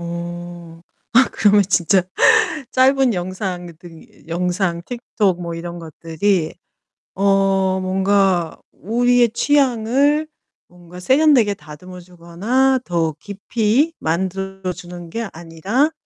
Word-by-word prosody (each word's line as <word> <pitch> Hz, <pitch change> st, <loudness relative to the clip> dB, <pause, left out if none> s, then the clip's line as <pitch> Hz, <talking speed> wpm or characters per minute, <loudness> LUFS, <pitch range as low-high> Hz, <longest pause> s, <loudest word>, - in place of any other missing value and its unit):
어. 170 Hz, 0 st, -7 dB, 0.3 s
아 260 Hz, +3 st, +5 dB
그러면 205 Hz, -1 st, +4 dB
진짜 180 Hz, 0 st, +3 dB, 0.7 s
짧은 265 Hz, -2 st, +3 dB
영상들이 175 Hz, -4 st, -7 dB
영상 175 Hz, +1 st, -1 dB
TikTok 210 Hz, -7 st, -2 dB
뭐 170 Hz, -1 st, -5 dB
이런 170 Hz, +1 st, -7 dB
것들이 165 Hz, +2 st, -2 dB, 0.6 s
어 195 Hz, -1 st, +2 dB
뭔가 190 Hz, -2 st, +1 dB
우리의 240 Hz, +3 st, +1 dB
취향을 275 Hz, +3 st, +1 dB, 0.4 s
뭔가 175 Hz, 0 st, -14 dB
세련되게 260 Hz, -, +3 dB
다듬어 180 Hz, +2 st, -12 dB
주거나 185 Hz, +10 st, -1 dB
더 165 Hz, -2 st, 0 dB
깊이 220 Hz, -, -1 dB
만들어 190 Hz, +3 st, -3 dB
주는 175 Hz, -1 st, -10 dB
게 230 Hz, +5 st, -4 dB
아니라 170 Hz, -, -1 dB
190 Hz, 225 characters per minute, -19 LUFS, 175-230 Hz, 0.7 s, 아